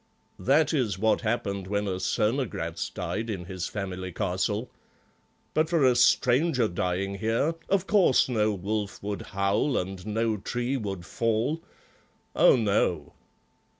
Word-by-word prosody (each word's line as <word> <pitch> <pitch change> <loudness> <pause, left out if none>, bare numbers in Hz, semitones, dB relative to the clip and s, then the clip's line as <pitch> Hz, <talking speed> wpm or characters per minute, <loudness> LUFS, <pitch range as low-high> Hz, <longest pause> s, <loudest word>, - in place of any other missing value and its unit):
That 150 +4 +3
is 120 -10 0
what 110 +3 +2
happened 105 -4 -2
when 100 +1 -1
a 95 -1 -2
Cernogratz 105 -5 -1
died 115 +2 -4
in 95 -5 -4
his 90 -2 -4
family 95 -2 -5
castle. 100 +7 -2 0.8
But 155 0 +2
for 165 -5 +3
a 125 -1 +5
stranger 125 +2 +3
dying 95 +1 -2
here, 115 +10 +1 0.2
of 195 -1 +2
course 195 -10 +4
no 110 -4 +1
wolf 100 +1 -3
would 100 0 -3
howl 100 +7 0
and 95 0 -4
no 110 0 0
tree 120 +6 -2
would 100 -8 -4
fall. 115 - 0 0.7
Oh, - - +6
no." 110 -5 0
110 Hz, 135 wpm, -27 LUFS, 95-125 Hz, 0.8 s, Oh